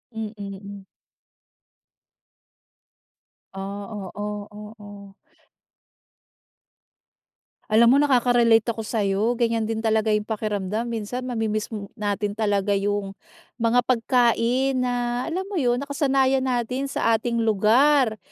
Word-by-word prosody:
Mm, 220 Hz, -1 st, -5 dB
hmm. 200 Hz, 0 st, -8 dB, 2.7 s
Ah, 195 Hz, +1 st, -6 dB, 0.3 s
oo, 205 Hz, 0 st, -5 dB
oo. 205 Hz, -2 st, -11 dB, 2.6 s
Alam 235 Hz, +3 st, +5 dB
mo, -, -, +5 dB
nakaka-relate 240 Hz, -4 st, +3 dB
ako 225 Hz, -, -6 dB
sa'yo. 215 Hz, +1 st, 0 dB
Ganyan 230 Hz, -2 st, 0 dB
din 225 Hz, 0 st, -3 dB
talaga 220 Hz, 0 st, +2 dB
yung 210 Hz, 0 st, +1 dB
pakiramdam. 215 Hz, 0 st, -3 dB
Minsan, 235 Hz, +3 st, -4 dB
mamimiss 220 Hz, -2 st, -2 dB
mo 210 Hz, -3 st, -6 dB
natin 205 Hz, -1 st, -2 dB
talaga 205 Hz, -2 st, 0 dB
yung 200 Hz, 0 st, -1 dB, 0.5 s
mga 235 Hz, +2 st, +3 dB
pagkain 250 Hz, +2 st, +2 dB
na 245 Hz, 0 st, -1 dB
alam 370 Hz, +3 st, -3 dB
mo 395 Hz, -4 st, -3 dB
yun, 245 Hz, -1 st, +2 dB
nakasanayan 270 Hz, -1 st, +1 dB
natin 255 Hz, +1 st, -2 dB
sa 230 Hz, -4 st, +1 dB
ating 235 Hz, +1 st, -2 dB
lugar, 225 Hz, +4 st, +3 dB
225 Hz, 105 wpm, -23 LUFS, 210-245 Hz, 2.7 s, Alam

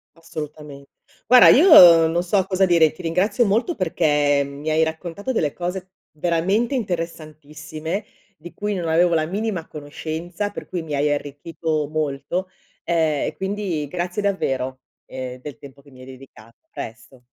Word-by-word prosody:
Assolutamente. 150 Hz, -3 st, -9 dB, 0.4 s
Guarda, 250 Hz, 0 st, +8 dB
io 180 Hz, -, +8 dB
non 170 Hz, +2 st, -1 dB
so 190 Hz, +1 st, +1 dB
cosa 190 Hz, 0 st, +2 dB
dire, 170 Hz, -3 st, +4 dB
ti -, -, -12 dB
ringrazio 200 Hz, +8 st, +1 dB
molto 230 Hz, -, 0 dB
perché 150 Hz, -5 st, +1 dB
mi 140 Hz, +2 st, -6 dB
hai 155 Hz, +1 st, +2 dB
raccontato 170 Hz, +8 st, -4 dB
delle 150 Hz, -, -1 dB
cose 185 Hz, +1 st, -5 dB, 0.2 s
veramente 180 Hz, -, 0 dB
interessantissime, 160 Hz, -, -5 dB, 0.3 s
di 170 Hz, +3 st, -12 dB
cui 210 Hz, 0 st, -3 dB
non 175 Hz, -3 st, -3 dB
avevo 170 Hz, +2 st, +3 dB
la 155 Hz, -1 st, +1 dB
minima 195 Hz, -1 st, -3 dB
conoscenza, 160 Hz, +6 st, -5 dB
per -, -, -9 dB
cui 175 Hz, -, -4 dB
mi 150 Hz, -3 st, -5 dB
hai 145 Hz, +1 st, +1 dB
arricchito 150 Hz, +1 st, -3 dB
molto, 155 Hz, +4 st, -3 dB, 0.3 s
ehm, 160 Hz, -4 st, 0 dB
e -, -, -4 dB
quindi 190 Hz, -6 st, -3 dB
grazie 180 Hz, +5 st, -3 dB
davvero, 130 Hz, -9 st, -2 dB, 0.3 s
ehm, 130 Hz, -1 st, -7 dB
del 130 Hz, -2 st, -9 dB
tempo 140 Hz, 0 st, -14 dB
che 140 Hz, -, -19 dB
mi 130 Hz, -, -17 dB
hai 130 Hz, -, -11 dB
dedicato. 125 Hz, -4 st, -15 dB
A -, -, -52 dB
presto. 115 Hz, +3 st, -9 dB
160 Hz, 155 wpm, -21 LUFS, 145-185 Hz, 0.4 s, Guarda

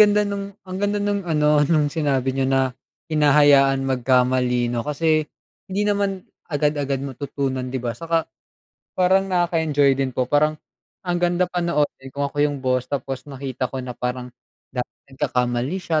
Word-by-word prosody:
ganda 210 Hz, 0 st, +6 dB
nung, 200 Hz, 0 st, -5 dB
ang 185 Hz, -1 st, -6 dB
ganda 205 Hz, 0 st, +1 dB
nung 205 Hz, 0 st, 0 dB
ano, 150 Hz, -4 st, +2 dB
nung 150 Hz, -3 st, +2 dB
sinabi 135 Hz, -5 st, 0 dB
niyo, 135 Hz, 0 st, 0 dB
na 135 Hz, -1 st, +2 dB, 0.4 s
hinahayaan 145 Hz, -2 st, +5 dB
magkamali, 125 Hz, -1 st, +2 dB
'no? 120 Hz, -, -1 dB
Kasi, 155 Hz, +3 st, +1 dB, 0.4 s
hindi 195 Hz, +2 st, -1 dB
naman 200 Hz, -2 st, 0 dB, 0.2 s
agad-agad 145 Hz, -3 st, 0 dB
matutunan, 135 Hz, -1 st, -3 dB
'di 130 Hz, -, -3 dB
ba? 120 Hz, -2 st, -2 dB
Saka 165 Hz, +6 st, -1 dB, 0.7 s
parang 190 Hz, +1 st, +3 dB
nakaka-enjoy 160 Hz, -6 st, +2 dB
din 135 Hz, 0 st, 0 dB
po. 130 Hz, -, +2 dB
Parang 150 Hz, +4 st, +2 dB, 0.5 s
ang 175 Hz, -1 st, -1 dB
ganda 175 Hz, +1 st, +2 dB
panoorin 170 Hz, -6 st, -1 dB
kung 140 Hz, +2 st, -3 dB
ako 145 Hz, +1 st, -2 dB
yung 145 Hz, -1 st, +2 dB
boss, 130 Hz, -1 st, 0 dB
tapos 135 Hz, 0 st, -4 dB
nakita 130 Hz, -2 st, -4 dB
ko 130 Hz, -1 st, -5 dB
na 125 Hz, -, -5 dB
parang 125 Hz, 0 st, -4 dB, 0.8 s
nagkakamali 125 Hz, +3 st, -1 dB
siya, 165 Hz, -4 st, 0 dB
145 Hz, 150 wpm, -22 LUFS, 130-175 Hz, 0.8 s, ganda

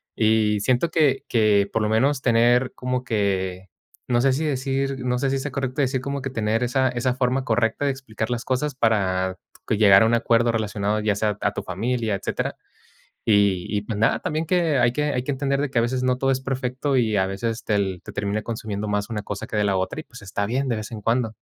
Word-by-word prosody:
Y 110 Hz, -1 st, +2 dB
siento 130 Hz, +9 st, +1 dB
que 150 Hz, -5 st, +2 dB
que 105 Hz, -3 st, +3 dB
por 115 Hz, -, +1 dB
lo 105 Hz, -, +1 dB
menos 135 Hz, +5 st, +2 dB
tener 120 Hz, +1 st, +3 dB
como 125 Hz, 0 st, -2 dB
que, 95 Hz, -4 st, -1 dB, 0.4 s
no 120 Hz, -1 st, +3 dB
sé, 135 Hz, 0 st, +3 dB
si 145 Hz, +5 st, -1 dB
decir, 135 Hz, -1 st, -1 dB
no 125 Hz, 0 st, 0 dB
sé 135 Hz, -, 0 dB
si 135 Hz, 0 st, 0 dB
sea 140 Hz, +2 st, -4 dB
correcto 130 Hz, +1 st, -2 dB
decir 130 Hz, -1 st, 0 dB
como 140 Hz, +1 st, -3 dB
que 135 Hz, -, -3 dB
tener 115 Hz, -1 st, 0 dB
esa 130 Hz, +2 st, +1 dB
esa 125 Hz, +1 st, 0 dB
forma 130 Hz, 0 st, 0 dB
correcta 115 Hz, +4 st, +1 dB
de 140 Hz, -, +2 dB
explicar 115 Hz, -5 st, -5 dB
las 120 Hz, -1 st, -2 dB
cosas 135 Hz, +2 st, -1 dB
para 95 Hz, -6 st, +1 dB, 0.3 s
que 110 Hz, -, +1 dB
llegar 100 Hz, -1 st, +7 dB
a -, -, +4 dB
un 115 Hz, -, +1 dB
acuerdo 115 Hz, 0 st, +2 dB
relacionado, 105 Hz, -1 st, -1 dB
ya 105 Hz, -1 st, +1 dB
sea 105 Hz, 0 st, -1 dB
a -, -, 0 dB
tu -, -, -4 dB
familia, 110 Hz, +3 st, -1 dB
etcétera. 95 Hz, -, -3 dB, 0.7 s
Y 100 Hz, -4 st, +3 dB
y 105 Hz, -1 st, -1 dB
pues 105 Hz, -1 st, -4 dB
nada, 115 Hz, -, +3 dB
también 160 Hz, -2 st, -2 dB
que 170 Hz, -4 st, +2 dB
hay 120 Hz, 0 st, +3 dB
que 150 Hz, +3 st, 0 dB
hay 125 Hz, -, -1 dB
que 145 Hz, -, -2 dB
entender 140 Hz, 0 st, 0 dB
de 145 Hz, -, -1 dB
que 130 Hz, -, -3 dB
a -, -, +3 dB
veces 125 Hz, +2 st, -1 dB
no 125 Hz, 0 st, +1 dB
todo 135 Hz, +1 st, +1 dB
es 130 Hz, 0 st, 0 dB
perfecto 130 Hz, +1 st, -2 dB
y 110 Hz, -4 st, +2 dB
a 95 Hz, -1 st, +2 dB
veces 110 Hz, +4 st, -3 dB
tel 100 Hz, -4 st, 0 dB
te -, -, -9 dB
termina 100 Hz, +1 st, -2 dB
consumiendo 105 Hz, -2 st, -4 dB
más 105 Hz, +1 st, -1 dB
una 105 Hz, -2 st, -2 dB
cosa 100 Hz, 0 st, -5 dB
que 110 Hz, -, -3 dB
de 105 Hz, -, +2 dB
la 100 Hz, -1 st, +1 dB
otra 95 Hz, +10 st, -2 dB
y -, -, -16 dB
pues, 115 Hz, -7 st, -13 dB
está 100 Hz, +1 st, -2 dB
bien 130 Hz, +4 st, -1 dB
de 115 Hz, -, 0 dB
vez 110 Hz, -1 st, -6 dB
en 110 Hz, -2 st, -6 dB
cuando. 115 Hz, 0 st, 0 dB
115 Hz, 235 wpm, -23 LUFS, 105-130 Hz, 0.7 s, llegar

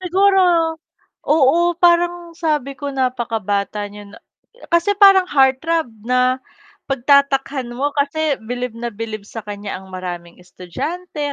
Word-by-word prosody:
siguro 385 Hz, +2 st, +3 dB, 0.9 s
oo, 325 Hz, +4 st, +3 dB
parang 345 Hz, 0 st, +2 dB
sabi 300 Hz, -5 st, -1 dB
ko 285 Hz, -, -4 dB
napakabata 225 Hz, -6 st, -2 dB
niya 205 Hz, 0 st, -12 dB
na -, -, -13 dB, 0.5 s
kasi 340 Hz, +4 st, +3 dB
parang 390 Hz, -2 st, +7 dB
heart 265 Hz, -2 st, +4 dB
throb 330 Hz, -3 st, 0 dB, 0.2 s
na 255 Hz, +1 st, +1 dB, 0.5 s
pagtatakhan 270 Hz, -1 st, +2 dB
mo, 275 Hz, +4 st, -2 dB
kasi 295 Hz, +1 st, 0 dB, 0.2 s
bilib 245 Hz, -1 st, -3 dB
na 235 Hz, +1 st, -5 dB
bilib 215 Hz, -1 st, -6 dB
sa 215 Hz, +1 st, -9 dB
kan'ya 205 Hz, -2 st, -6 dB
ang 190 Hz, -1 st, -13 dB
maraming 175 Hz, -2 st, -7 dB
estudyante 290 Hz, -, -5 dB
270 Hz, 125 wpm, -19 LUFS, 220-330 Hz, 0.9 s, parang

